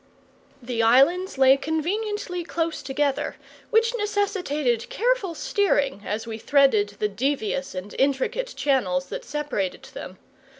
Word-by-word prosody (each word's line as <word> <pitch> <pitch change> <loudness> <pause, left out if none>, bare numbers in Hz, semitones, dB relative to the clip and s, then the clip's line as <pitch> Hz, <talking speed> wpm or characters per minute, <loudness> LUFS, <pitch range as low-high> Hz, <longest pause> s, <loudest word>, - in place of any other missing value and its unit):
The 235 -1 -1
islands 275 +11 +4
lay 265 0 +6
conveniently 360 +5 -2
close 330 -1 -2
together, 275 +1 -1 0.3
which 460 +1 +3
necessitated 385 - -1
careful 465 -7 0
steering 390 - +1
as 215 +2 -2
we 225 -1 -6
threaded 220 -7 +3
the 210 - +1
devious 265 +2 -2
and 185 +3 -6
intricate 280 - 0
channels 185 -11 +1
that - - -5
separated 285 -11 -3
them. - - -8
280 Hz, 120 wpm, -24 LUFS, 235-375 Hz, 0.3 s, lay